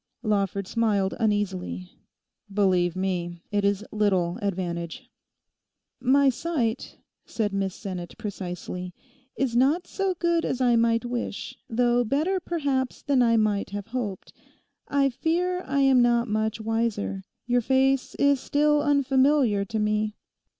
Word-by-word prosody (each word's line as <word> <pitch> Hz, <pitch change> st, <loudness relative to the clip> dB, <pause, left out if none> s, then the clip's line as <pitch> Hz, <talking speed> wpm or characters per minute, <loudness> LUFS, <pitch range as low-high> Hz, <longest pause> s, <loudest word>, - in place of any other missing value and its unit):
Lawford 200 Hz, -3 st, 0 dB
smiled 205 Hz, -4 st, +1 dB
uneasily. 190 Hz, -, -1 dB, 0.6 s
'Believe 185 Hz, -3 st, +2 dB
me, 175 Hz, -2 st, -3 dB
it 205 Hz, -1 st, +1 dB
is 200 Hz, +1 st, +1 dB
little 190 Hz, -3 st, +1 dB
advantage.' 175 Hz, -4 st, -4 dB, 0.9 s
'My 270 Hz, +2 st, +4 dB
sight,' 260 Hz, -4 st, -2 dB, 0.3 s
said 210 Hz, -3 st, -2 dB
Miss 195 Hz, -1 st, -1 dB
Sinnet 180 Hz, -4 st, -6 dB
precisely, 180 Hz, -3 st, -6 dB, 0.4 s
'is 260 Hz, -3 st, -1 dB
not 285 Hz, +8 st, +3 dB
so 385 Hz, -2 st, -2 dB
good 340 Hz, -1 st, +1 dB
as 255 Hz, -, -2 dB
I 245 Hz, -2 st, +3 dB
might 230 Hz, +1 st, +2 dB
wish; 240 Hz, -4 st, -4 dB
though 240 Hz, +1 st, +2 dB
better 310 Hz, -, 0 dB
perhaps 280 Hz, -7 st, -2 dB
than 275 Hz, -3 st, +2 dB
I 230 Hz, -1 st, +4 dB
might 210 Hz, -2 st, +1 dB
have 205 Hz, +2 st, -6 dB
hoped; 225 Hz, -6 st, -4 dB, 0.5 s
I 280 Hz, -1 st, +2 dB
fear 355 Hz, +7 st, 0 dB
I 280 Hz, +1 st, +1 dB
am 265 Hz, -2 st, +5 dB
not 240 Hz, 0 st, +3 dB
much 215 Hz, +1 st, -1 dB
wiser; 220 Hz, -3 st, -1 dB, 0.2 s
your 245 Hz, 0 st, +2 dB
face 265 Hz, +2 st, +1 dB
is 280 Hz, -1 st, +3 dB
still 295 Hz, +2 st, +2 dB
unfamiliar 275 Hz, -6 st, +3 dB
to 220 Hz, +3 st, -4 dB
me. 210 Hz, 0 st, 0 dB
225 Hz, 130 wpm, -26 LUFS, 200-270 Hz, 0.9 s, am